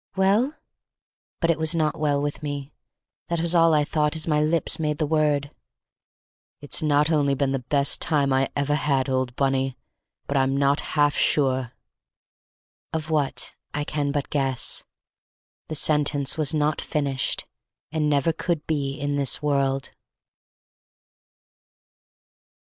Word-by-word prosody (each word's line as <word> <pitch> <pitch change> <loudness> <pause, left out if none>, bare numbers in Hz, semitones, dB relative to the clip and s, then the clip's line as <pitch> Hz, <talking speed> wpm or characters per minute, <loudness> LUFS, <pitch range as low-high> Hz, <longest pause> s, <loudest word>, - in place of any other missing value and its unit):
"Well?" 205 +10 +2 0.9
But 165 -1 +3
it 165 - -2
was 160 +1 +2
not 155 0 0
well 145 -2 +1
with 145 0 -3
me; 145 -1 -5 0.5
that 170 -1 -1
was 170 +1 +2
all 165 -1 +5
I 150 -1 +3
thought 150 0 0
as 160 - +1
my 150 -2 +2
lips 160 +2 +1
made 150 -2 -1
the 155 - 0
word. 150 -2 +1 1.1
"It's 145 +4 0
not 150 0 +2
only 145 -3 +2
been 135 0 0
the 135 - -1
best 140 +3 +2
time 140 -3 +2
I 135 0 +1
ever 145 +1 0
had, 140 -3 +1
old 130 -2 -1
Bunny, 135 -1 0 0.5
but 140 - -1
I'm 135 0 +1
not 140 +1 +2 0.2
half 145 0 +3
sure—" 130 -4 +2 1.2
Of 160 0 -4
what 140 -5 -1 0.2
I 150 - -1
can 145 -1 -2
but 140 -1 -3
guess; 135 -3 0 0.8
the 155 - -5
sentence 145 -2 +1
was 155 -3 +1
not 150 -1 0
finished, 140 -3 -1 0.5
and 155 -1 0
never 145 +3 +2
could 165 -1 -2
be 140 -3 -2
in 145 0 -1
this 140 +2 +1
world. 135 -2 0
145 Hz, 145 wpm, -24 LUFS, 140-155 Hz, 1.2 s, all